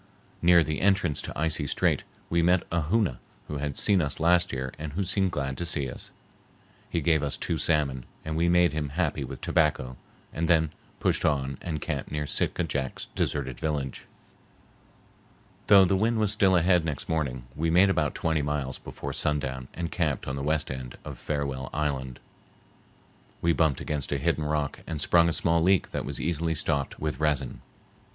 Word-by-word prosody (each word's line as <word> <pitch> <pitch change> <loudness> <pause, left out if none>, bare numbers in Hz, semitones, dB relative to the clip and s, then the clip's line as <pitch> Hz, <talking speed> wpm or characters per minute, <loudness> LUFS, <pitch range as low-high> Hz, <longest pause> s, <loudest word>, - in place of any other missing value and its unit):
Near 85 -1 +6
the 75 0 -3
entrance 95 -6 +2
to - - -6
Icy 80 -2 0
Strait - - +1 0.2
we 85 0 +1
met 90 +1 +3
a 85 0 +1
Hoona 100 - +1 0.3
who 75 - -4
had 70 -1 -3
seen 100 -3 +3
us 70 -3 -1
last 85 +2 +3
year 65 -1 -4
and 75 -1 -5
who 100 +5 -1
seemed 95 +1 +1
glad 70 -3 -3
to - - -1
see 70 -5 -1
us. - - -8 0.8
He 85 - -1
gave 80 0 +3
us 70 -2 -2
two 80 - -2
salmon, 70 -5 +1 0.2
and 80 0 -3
we 85 +2 +2
made 90 -2 +4
him 75 -2 -2
happy 75 -2 -1
with 65 0 -8
tobacco 65 -5 +1 0.4
and 85 +1 -1
then 80 -3 +3 0.3
pushed - - +1
on 70 -3 0
and 80 -3 -3
camped - - -3
near 75 0 -2
Sitka 85 - 0
Jack's 70 -5 -3
deserted 65 -4 -2
village. 70 -4 -3 1.6
Though 100 -2 +8
the 95 - +2
wind 110 +4 +1
was 105 -2 +1
still 100 -3 +4
ahead 90 0 +4
next 75 -4 -3
morning, 70 -6 -1
we 80 +2 0
made 95 +4 +5
about 75 -6 0
twenty 80 -2 0
miles 70 -2 -2
before - - -6
sundown 65 -4 -1
and 85 -1 -3
camped 80 -7 -1
on 65 - -2
the 70 - -4
west 75 +1 0
end 65 -2 -7
of - - -7
Farewell 70 -3 -3
Island. 70 -4 -2 1.2
We 85 0 +2
bumped 80 -5 +2
against 75 -3 -3
a - - +1
hidden 75 - 0
rock 75 -2 -1
and 80 -2 -4
sprung 85 +1 +4
a - - +1
small 85 +1 +2
leak 95 +2 +3
that - - -3
was - - -3
easily 80 0 -1
stopped 70 -2 -1
with 75 -3 -3
resin. 70 -5 0
75 Hz, 185 wpm, -27 LUFS, 70-85 Hz, 1.6 s, Though